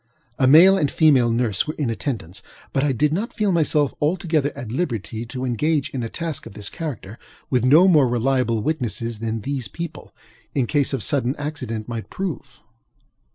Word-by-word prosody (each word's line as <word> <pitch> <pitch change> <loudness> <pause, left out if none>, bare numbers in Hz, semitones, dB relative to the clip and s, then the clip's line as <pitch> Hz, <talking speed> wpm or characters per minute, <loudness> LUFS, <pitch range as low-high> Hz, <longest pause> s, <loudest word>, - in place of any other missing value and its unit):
A 130 - +4
male 175 +8 +8
and 145 - +1
a - - -9
female 135 -7 +4
nurse 115 -2 0
were 155 - -4
in 140 -6 -1
attendance; 105 - -4 0.3
but 135 - +1
I 145 - +2
did 150 +4 +1
not 210 +8 -2
feel 210 -2 0
myself 150 -4 +2
altogether 155 -2 +1
at 115 -3 -6
liberty 115 - -3
to 130 +1 -5
engage 145 +4 0
in 130 - -3
a 115 - -3
task 165 -1 -4
of 100 - -13
this 105 -1 -5
character 125 - -6 0.3
with 125 -3 +2
no 155 +9 +6
more 150 -8 +5
reliable 120 -2 +1
witnesses 120 -6 -2
than 115 0 -3
these 135 -2 -3
people, 165 +7 -7 0.4
in 135 -3 +2
case 145 +2 +1
of 130 -6 -1
sudden 135 -1 0
accident, 130 -7 -5
might 115 -2 -6
prove. 160 -9 -6
135 Hz, 185 wpm, -22 LUFS, 115-155 Hz, 0.4 s, male